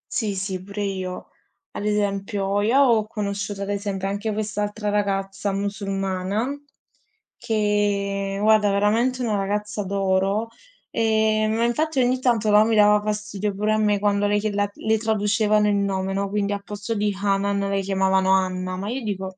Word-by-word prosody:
Sì, 215 -7 -1
sì, 190 -1 -3
pure 200 +2 -5
io. 185 -2 -4 0.4
Ad 205 - -5
esempio, 200 -1 0
io 225 +6 +2
ho 230 -5 +3
conosciuto, 200 -2 -4
ad 200 - -3
esempio, 200 -1 -2
anche 205 +3 -2
quest'altra 210 0 -2
ragazza 195 -1 -1
musulmana 195 +2 -2 0.9
che 200 -2 0
guarda 215 -1 +4
veramente 230 +6 +1
una 220 -3 0
ragazza 205 +1 -2
d'oro, 195 +2 0 0.4
e 220 -1 +2
ma 225 +2 0
infatti 300 +4 0
ogni 255 0 +2
tanto, 230 -4 +2
no, 210 +1 +7
mi 225 0 +1
dava 210 0 +5
fastidio 210 -1 -3
pure 210 +2 +1
a - - +2
me 210 -1 +2
quando 205 0 +1
lei 205 0 +2
chiede 210 -1 -2
la 205 0 +1
le 220 0 0
traducevano 215 -1 +2
il 205 - +2
nome, 195 -1 -1
no, 200 0 -1
quindi 205 0 -1
al 200 0 -5
posto 210 +2 -5
di 210 0 +1
Hanan 200 0 +1
la 200 0 0
chiamavano 190 -1 +1
Anna, 185 -1 0
ma 195 +3 -4
io 265 +2 -3
dico 190 -3 -4
205 Hz, 165 wpm, -23 LUFS, 195-215 Hz, 0.9 s, no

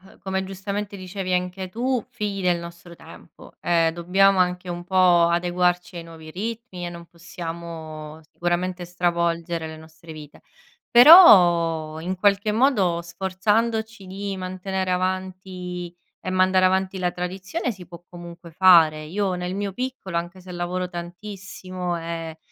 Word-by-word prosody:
uhm, 190 +1 -19
come 190 0 -2
giustamente 200 +2 -5
dicevi 185 0 -4
anche 180 +1 -2
tu, 245 +5 -1
figli 210 -6 -4
del 180 -2 +1
nostro 170 0 -11
tempo. 160 0 -15
Ehm, 165 -1 +2
dobbiamo 190 +3 +3
anche 180 0 0
un 175 0 -5
po' 180 -2 +4
adeguarci 175 +1 0
ai 170 - -6
nuovi 160 -1 -12
ritmi, 215 -1 -6
e - - -3
non 170 0 -9
possiamo 165 -2 -8
sicuramente 175 +1 -2
stravolgere 170 -1 -1
le 160 0 -8
nostre 160 +1 -13
vite, 150 -1 -12 0.5
però 175 - +7
in 185 +3 -3
qualche 200 +2 +2
modo 210 -8 +2
sforzandoci 210 +4 -1
di 195 +1 -5
mantenere 185 0 -3
avanti 185 -1 -4 0.3
e 185 - -4
mandare 185 0 +3
avanti 190 +1 +1
la 180 -1 0
tradizione 190 - -4
si 190 -4 -12
può 170 0 -12
comunque 170 -1 -11
fare. 165 -4 +5
Io 190 +4 -2
nel 180 +1 -4
mio 200 -1 -3
piccolo, 250 -7 -5
anche 175 +2 -4
se 185 0 -13
lavoro 180 +1 -3
tantissimo, 180 0 -6
e 165 -1 -6
180 Hz, 140 wpm, -23 LUFS, 170-190 Hz, 0.5 s, però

